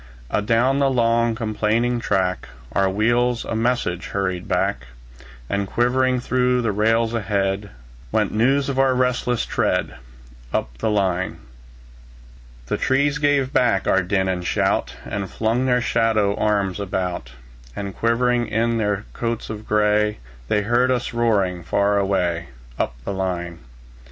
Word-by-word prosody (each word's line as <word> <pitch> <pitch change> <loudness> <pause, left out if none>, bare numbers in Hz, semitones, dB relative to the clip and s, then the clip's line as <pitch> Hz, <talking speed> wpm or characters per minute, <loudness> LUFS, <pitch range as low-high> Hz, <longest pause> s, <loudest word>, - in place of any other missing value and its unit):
Adown 115 +6 +2
the 140 -1 +3
long, 115 -2 +2
complaining 115 +2 0
track, 95 -4 -1 0.2
Our 95 +6 +2
wheels 120 +4 +1
a - - -3
message 115 -6 -1
hurried 95 -2 -2
back; 65 +1 -1 0.6
And 100 +4 -1
quivering 125 +3 +1
through 125 0 +1
the 115 - +1
rails 115 +3 +2
ahead, 100 -2 -1 0.4
Went - - +1
news 135 +6 +2
of 135 -1 -1
our 135 -1 +3
resistless 125 -1 0
tread, - - -1 0.5
Up - - -2
the - - 0
line. 95 -3 0 1.3
The - - -2
trees 140 +2 +1
gave 145 -2 +1
back 115 -6 +2
our 95 - +4
din 95 +1 0
and 90 -1 -1
shout, - - 0
And 100 -2 -4
flung 115 +4 0
their 125 -1 +3
shadow 110 -4 +2
arms 100 -3 0
about; 90 -9 -3 0.4
And 100 -1 -5
shivering 120 +1 +2
in 115 +1 0
their 105 -1 -1
coats 115 -1 -3
of 110 0 -8
gray, 105 0 +2 0.3
They 105 +8 +1
heard 120 +4 +2
us 125 -2 -1
roaring 100 -7 +1
far 100 +4 +1
away, 90 -4 0 0.3
Up - - -1
the - - -2
line. 90 -3 -3
110 Hz, 140 wpm, -22 LUFS, 95-120 Hz, 1.3 s, our